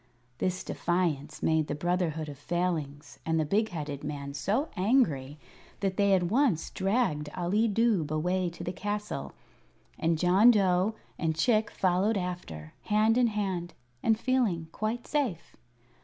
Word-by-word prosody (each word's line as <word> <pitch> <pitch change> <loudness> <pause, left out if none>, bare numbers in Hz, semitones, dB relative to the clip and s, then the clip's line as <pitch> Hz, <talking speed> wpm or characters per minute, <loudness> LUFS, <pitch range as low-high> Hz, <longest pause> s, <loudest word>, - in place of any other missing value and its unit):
This 185 0 -1
defiance 160 -4 -1
made 160 -1 +2
the 145 - -2
Brotherhood 165 -1 -1
of 145 -2 -9
Failings 160 -5 -3
and 160 0 0
the 155 - +1
big 215 +7 +1
headed 150 -5 -5
man 140 -1 -5
so 220 - -1
angry 175 - +1 0.4
that 195 -2 0
they 200 0 +4
at 180 - +1
once 215 - +1
dragged 190 -7 0
Ali 195 +6 +2
Dubh 210 -7 +2
away 180 +4 0
to 170 - -9
the 180 - -3
castle, 205 +2 -4 0.7
and 165 0 +1
John 185 +7 +5
Dough 195 -1 +3 0.2
and 160 -2 0
Chick 215 +5 +2
followed 190 +4 +1
after, 175 - -5
hand 215 +2 +3
in 245 -1 +4
hand, 190 -5 -3 0.3
and 225 -1 +2
feeling 225 -11 0
quite 220 +5 -3
safe. 260 - -2
180 Hz, 145 wpm, -29 LUFS, 160-210 Hz, 0.7 s, John